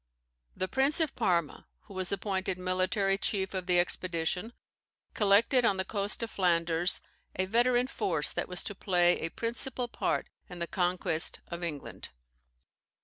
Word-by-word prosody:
The 185 - -1
Prince 270 - +1
of 320 -3 +1
Parma, 175 -9 0
who 200 - -14
was 185 -1 -1
appointed 190 -2 -1
military 185 +2 0
chief 190 -2 0
of 185 -1 -4
the 180 -1 +4
expedition, 180 +3 -1 0.6
collected 220 +5 +4
on 200 -5 +3
the 190 - -1
coast 205 +3 -2
of 230 - -4
Flanders 170 -2 +2 0.3
a 185 - +1
veteran 245 +4 +3
force 160 - +1
that - - -3
was 180 - -2
to 205 - -4
play 180 -3 +2
a 165 - -2
principal 240 +4 -3
part - - -1 0.2
in 180 - -8
the 170 - -2
conquest 175 -2 0
of 170 0 -5
England. 155 -5 -6
190 Hz, 150 wpm, -30 LUFS, 175-215 Hz, 0.6 s, the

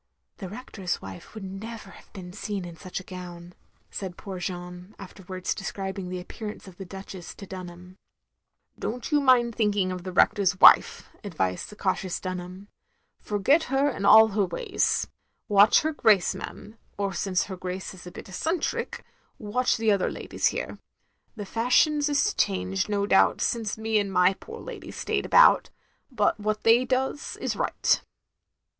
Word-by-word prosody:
"The 190 -4 -7
Rector's 200 -4 -5
wife 95 - -11
would 215 - -7
never 195 +2 -8
have - - -17
been 180 -2 -9
seen 205 -2 -4
in 170 -1 -9
such 180 +4 -6
a - - -10
gown,'* 175 -1 -9 0.4
said 185 -3 -6
poor 190 -3 -7
Jeanne, 180 +1 -7
after 195 0 -11
wards 185 0 -3
describing 195 -1 -5
the 180 0 -4
appearance 210 +3 -8
of 180 -2 -13
the 195 - -7
Duchess 190 -1 -9
to 200 - -10
Dtinham. 180 -1 -10 0.8
"Don't 245 +5 -4
you 295 -1 +4
mind 245 -3 +4
thinking 205 -4 +1
of 180 -1 -5
the 185 - -5
Rector's 185 0 +3
wife," - - +6 0.2
advised 125 - -2
the 210 - -11
cautious 185 -2 -2
Dunham. 185 +1 -6 0.5
"Forget 270 +11 +2
her 270 +2 +1
and 200 -7 -2
all 220 +1 +8
her 205 0 +1
ways. 170 - 0 0.4
Watch 205 0 +6
her 315 0 -1
Grace, 215 -9 +3
ma'am; 215 +2 -9 0.2
or 200 -1 -1
since 185 0 0
her 190 - -6
Grace 185 +1 -5
is 180 -1 -12
a - - -8
bit - - -10
eccentric, 320 - -2 0.3
watch 250 +4 0
the 225 -1 +2
other 200 -2 +1
ladies - - -1
here. - - -4 0.6
The 210 -2 -6
fashions 290 +8 +2
is 285 -1 +2
changed, 95 - 0
no 200 -1 0
doubt, 195 -1 +4
since 225 -3 -1
me 220 0 +1
and 200 -1 -2
my 180 0 +4
poor - - -11
lady - - -9
stayed - - -2
about, - - +6 0.4
but 215 -5 +1
what 215 0 -2
they 235 +3 +5
does, 265 +3 -2
is - - -2
right.' - - +1
195 Hz, 165 wpm, -26 LUFS, 185-220 Hz, 0.8 s, all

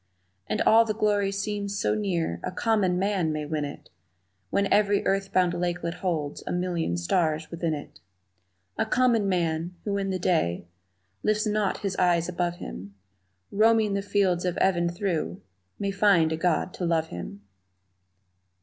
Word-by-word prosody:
And 105 - 0
all 225 +1 +6
the 215 -2 -2
glory 205 -2 +1
seems 200 0 -3
so - - +1
near 175 - -1
A - - -3
common 190 -2 +1
man 190 -4 0
may 155 -1 -3
win 150 0 -2
it 145 0 -8 0.6
When 200 - +1
every 205 -1 +3
earth 195 0 0
bound 180 -2 +3
lakelet 175 -1 -2
holds 170 -5 -3
A - - -2
million 175 - -1
stars 155 - 0
within 170 -2 -1
it. 145 - -10 0.8
A - - +2
common 235 -4 +2
man, 170 -1 -1
who 200 -1 0
in 195 0 -2
the 190 - -1
day 160 - 0 0.6
Lifts 215 +1 +1
not 210 -2 0
his 190 -1 -1
eyes 175 -2 +2
above 175 -1 -1
him, 100 - -8 0.6
Roaming 220 0 +3
the 200 - 0
fields 195 -3 +1
of 180 -1 -1
even 175 -2 +2
through 175 -2 -2 0.4
May 200 -1 -2
find 195 -5 +4
a - - +1
God 175 +2 0
to 180 - -3
love 165 -1 +1
him! 90 +3 -7
180 Hz, 160 wpm, -26 LUFS, 165-200 Hz, 0.8 s, all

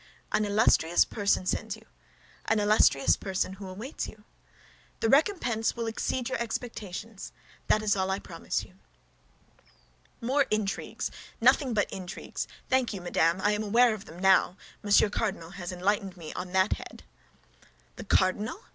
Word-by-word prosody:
"An 215 0 +2
illustrious 200 -5 +4
person 200 -3 0
sends 215 +3 -2
you; 220 0 -17 0.6
an 220 - +2
illustrious 205 -9 +4
person 190 -1 -2
awaits 200 +8 -6
you. 215 -1 -13 0.8
The 225 - +1
recompense 270 - +2
will 235 -1 -3
exceed 235 +2 -2
your 260 - -2
expectations; 225 -3 -5 0.4
that 215 - +3
is 205 -1 +2
all 190 -1 0
I 190 - 0
promise - - -4
you." - - -17 1.4
"More 265 +3 +1
intrigues! 215 -2 -2 0.3
Nothing 260 -6 +4
but 205 - 0
intrigues! 185 -1 -5 0.2
Thank 255 -4 +1
you, 190 - -6
madame, 170 0 +1
I 205 - +3
am 210 0 0
aware 230 +3 +4
of 210 -2 -8
them 165 - -12
now; 190 0 +4 0.2
Monsieur 205 +1 +5
Cardinal 200 -5 -3
has 185 -2 -6
enlightened 190 +1 -1
me 160 -3 -8
on 180 0 -6
that 190 +2 +3
head." - - -9 0.9
"The - - -6
cardinal?" 205 - +1
205 Hz, 145 wpm, -28 LUFS, 190-225 Hz, 1.4 s, Monsieur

